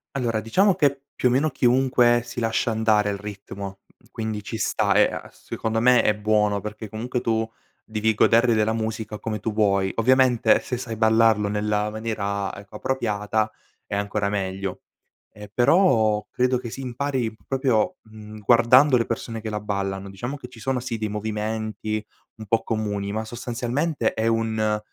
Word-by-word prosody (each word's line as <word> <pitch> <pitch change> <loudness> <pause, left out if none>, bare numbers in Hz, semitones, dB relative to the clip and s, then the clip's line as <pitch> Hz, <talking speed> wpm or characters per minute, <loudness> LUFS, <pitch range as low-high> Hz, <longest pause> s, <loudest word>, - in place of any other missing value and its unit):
Allora, 120 -5 0
diciamo 190 - +3
che 140 -6 +1
più 125 - +2
o - - 0
meno 140 +5 +2
chiunque 125 -2 +3
si 120 0 -7
lascia 115 0 0
andare 110 -2 +2
al 100 - -2
ritmo, 100 -1 -8
mhmm, - - -28
quindi 110 -1 -4
ci 110 - -5
sta - - +1
e - - +7
a - - -7
secondo 110 0 -3
me 125 +1 +5
è 105 - +2
buono 105 -1 +1
perché 105 +1 -7
comunque 120 +4 -3
tu 115 -1 0 0.4
devi 110 0 0
godere 115 +2 +4
della 110 +1 +2
musica 110 -1 -4
come 110 -1 -3
tu 110 +2 -3
vuoi. 100 -2 +2
Ovviamente 125 0 +4
se 125 - -4
sai 120 -2 -5
ballarlo 110 -1 +3
nella 105 0 0
maniera, 100 -3 -3
ecco, 100 0 -12
appropriata 110 -4 -1 0.3
è - - -4
ancora 100 0 -1
meglio. 95 -1 -3 0.5
Ehm, 105 0 -11
però 120 - +3
credo 125 0 +1
che 120 -2 -6
si 135 - -7
impari 130 -2 -2
proprio, 130 +3 +1
mhmm, 110 -1 -11
guardando 125 +5 +5
le 115 - 0
persone 115 -1 -4
che 110 - -4
la 105 0 -3
ballano. 100 -1 -3
Diciamo 120 +8 -5
che 125 - -10
ci 125 -2 -15
sono, 130 +2 -1
sì, 120 -2 -4
dei 110 0 -2
movimenti 110 0 -3 0.3
un 110 - -9
po' 110 +2 +1
comuni, 105 -3 -2
ma 110 +1 -3
sostanzialmente 120 +4 -2
è 110 +1 -1
un 110 -2 +1
110 Hz, 170 wpm, -24 LUFS, 105-120 Hz, 0.5 s, e